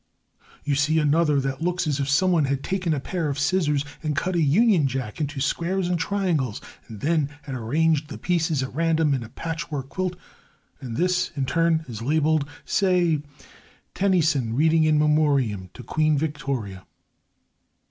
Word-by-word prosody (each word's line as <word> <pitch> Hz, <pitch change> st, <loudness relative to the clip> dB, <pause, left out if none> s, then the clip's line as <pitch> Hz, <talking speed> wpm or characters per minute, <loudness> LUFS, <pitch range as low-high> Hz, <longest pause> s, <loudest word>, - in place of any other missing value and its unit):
You 145 Hz, -, 0 dB
see 150 Hz, +3 st, +2 dB
another 150 Hz, -1 st, +3 dB
that 135 Hz, +1 st, -3 dB
looks 180 Hz, +1 st, 0 dB
as 145 Hz, -2 st, -1 dB
if 140 Hz, 0 st, -1 dB
someone 170 Hz, +1 st, +3 dB
had 140 Hz, 0 st, -2 dB
taken 185 Hz, -3 st, -1 dB
a 150 Hz, -, +1 dB
pair 165 Hz, +2 st, -3 dB
of 140 Hz, -, -3 dB
scissors 150 Hz, -2 st, +1 dB, 0.2 s
and 155 Hz, -2 st, -2 dB
cut 185 Hz, +6 st, -1 dB
a 170 Hz, -, +2 dB
Union 170 Hz, +1 st, +4 dB
Jack 130 Hz, 0 st, -4 dB
into 145 Hz, -1 st, -3 dB
squares 175 Hz, +6 st, -1 dB
and 175 Hz, -1 st, 0 dB
triangles, 165 Hz, -, -1 dB, 0.3 s
and 110 Hz, -2 st, -9 dB
had -, -, 0 dB
then 155 Hz, -4 st, +1 dB, 0.2 s
rearranged 145 Hz, +5 st, 0 dB
the -, -, -7 dB
pieces 165 Hz, -5 st, 0 dB
at 130 Hz, -, -6 dB
random 160 Hz, -1 st, +2 dB
in 130 Hz, -, -1 dB
a 115 Hz, -, -8 dB
patchwork 155 Hz, -1 st, -5 dB
quilt, 185 Hz, +1 st, -2 dB, 0.6 s
and 120 Hz, -4 st, -6 dB
this, 180 Hz, 0 st, +1 dB
in 135 Hz, -2 st, -1 dB
turn, 165 Hz, +2 st, +1 dB
is 115 Hz, -3 st, -7 dB
labelled, 155 Hz, +2 st, +1 dB, 0.2 s
say, 180 Hz, -5 st, +2 dB, 0.7 s
"Tennyson 160 Hz, -, +1 dB
reading 160 Hz, +3 st, +3 dB
In 155 Hz, -1 st, +3 dB
Memoriam 140 Hz, -11 st, +2 dB
to 125 Hz, -, -9 dB
Queen 155 Hz, +1 st, +1 dB
Victoria." 135 Hz, -, -3 dB
150 Hz, 165 wpm, -24 LUFS, 135-165 Hz, 0.7 s, Union